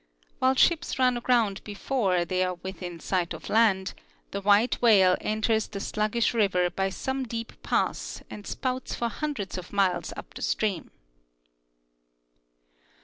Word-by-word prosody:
While 260 +1 +3
ships 340 +5 +2
run 255 -1 +3
aground 235 -5 +1
before 200 -4 0
they 185 +1 0
are 185 0 -1
within 180 -1 -7
sight 180 0 -1
of - - -9
land, 205 -4 +3 0.4
the 200 - -3
white 205 +4 +3
whale 195 -6 +6
enters 220 0 0
the 200 - -6
slug 215 +1 -1
gish 235 0 +2
river 180 -5 +2
by 195 0 -1
some 265 +7 -3
deep 230 -1 -5
pass - - -1
and 205 - -9
spouts 255 -1 -3
for 235 - -1
hundreds 230 -9 -4
of 180 - -11
miles 195 -3 +1
uja - - -6
the - - -9
stream. 200 -6 -1
210 Hz, 145 wpm, -27 LUFS, 190-235 Hz, 0.4 s, whale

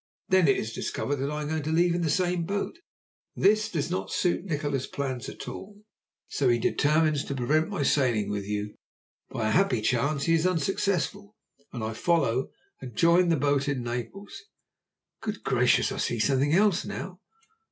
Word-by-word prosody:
Then 185 -3 +4
it 135 - +4
is 110 +1 -4
discovered 145 +5 -2
that 135 +1 -2
I 150 0 -3
am - - -4
going 160 0 -1
to 155 +2 -3
leave 170 +2 +3
in 175 - -1
the 165 - 0
same 180 +1 +1
boat. 200 - -3 0.6
This 215 +2 +3
does 155 -5 -2
not 95 0 -3
suit 175 0 0
Nikola's 145 -6 -2
plans 130 -4 -4
at - - -9
all, 205 +1 -9 0.4
so 135 -3 +1
he 120 - +4
determines 150 +4 +2
to 140 - -4
prevent 150 +7 +1
my 195 -8 -2
sailing 125 -8 +1
with 100 -1 -3
you. 105 0 -3 0.6
By 110 -1 -2
a - - 0
happy 180 - +3
chance 140 +6 0
he 165 - +2
is 165 +2 +3
unsuccessful, 195 +3 -1 0.4
and 120 -4 -5
I 110 0 -3
follow 130 -2 +1 0.3
and 125 -4 -9
join 170 +5 +4
the 165 - +4
boat 140 0 +1
in 135 -4 -1
Naples. 120 - -6 0.8
Good 215 -2 -5
gracious! 125 -1 +2
I - - -4
see 120 - -1
something 135 +5 +2
else 195 +1 +3
now." 185 -1 -6
150 Hz, 185 wpm, -27 LUFS, 125-180 Hz, 0.8 s, Then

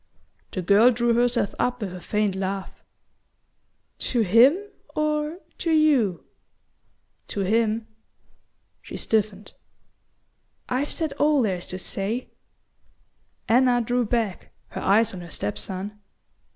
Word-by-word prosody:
The 185 - -3
girl 205 +6 +6
drew 240 -1 +2
herself 240 -3 +1
up 245 0 0
with 200 -5 -4
a 180 - -8
faint 210 0 0
laugh. 195 0 -4 1.2
"To 240 - +1
him 230 - +6 0.4
or 305 +1 0 0.2
to 335 - -1
YOU?" 285 - +3 1.0
"To 200 - -3
him." 220 +2 +1 1.0
She - - -8
stiffened. 210 -2 -1 1.1
"I've 265 +3 -1
said 315 -4 -1
all 295 -3 +4
there 190 -4 0
is 175 - -7
to 185 - -4
say." 200 +6 -3 1.2
Anna 245 +1 +4
drew 245 +1 0
back, 220 -4 -2 0.2
her - - -6
eyes 215 +3 +3
on 180 - -7
her 170 - -10
step 105 -8 -4
son. 195 - -6
225 Hz, 125 wpm, -24 LUFS, 195-250 Hz, 1.2 s, girl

